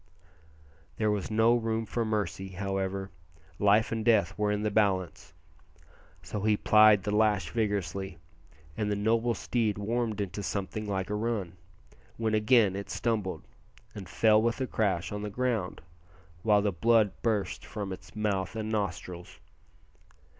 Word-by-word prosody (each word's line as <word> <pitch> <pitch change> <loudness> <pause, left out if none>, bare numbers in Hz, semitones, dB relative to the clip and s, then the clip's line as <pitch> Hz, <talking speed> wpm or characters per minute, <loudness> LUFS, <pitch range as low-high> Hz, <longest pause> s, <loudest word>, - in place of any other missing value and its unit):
There 110 -1 +1
was 105 -2 -2
no 110 +2 +4
room 115 -1 -1
for 115 +2 -2
mercy, 100 -3 -3
however 95 0 -3 0.5
life 105 +2 +4
and 115 -1 -2
death 110 -2 +3
were 105 0 0
in 105 0 -1
the 105 - 0
balance 95 -4 0 0.9
so 105 - -5
he 105 0 +2
plied 105 -2 +6
the 105 0 -1
lash 105 -6 +2
vigorously, 100 -4 -2 0.6
and 105 -1 -1
the - - +1
noble 115 +3 +1
steed 110 -4 -1
warmed 110 +1 -2
into 100 0 -3
something 105 +2 -4
like 95 0 -2
a - - 0
run, 105 -5 -2 0.6
when 110 -1 -1
again 110 -2 +4
it 100 0 -6
stumbled, 110 -5 -2 0.5
and 95 -4 -9
fell 110 +1 +4
with 115 +2 0
a 130 - 0
crash 100 -8 -1
on 105 0 -4
the 105 - -4
ground, 115 -4 -2 0.6
while 105 0 +3
the 105 - +1
blood 110 +3 +3
burst 105 -5 -1
from 100 -3 -5
its 95 - -12
mouth 105 -1 -1
and 110 0 -3
nostrils. 90 -4 -4
105 Hz, 150 wpm, -29 LUFS, 95-110 Hz, 0.9 s, plied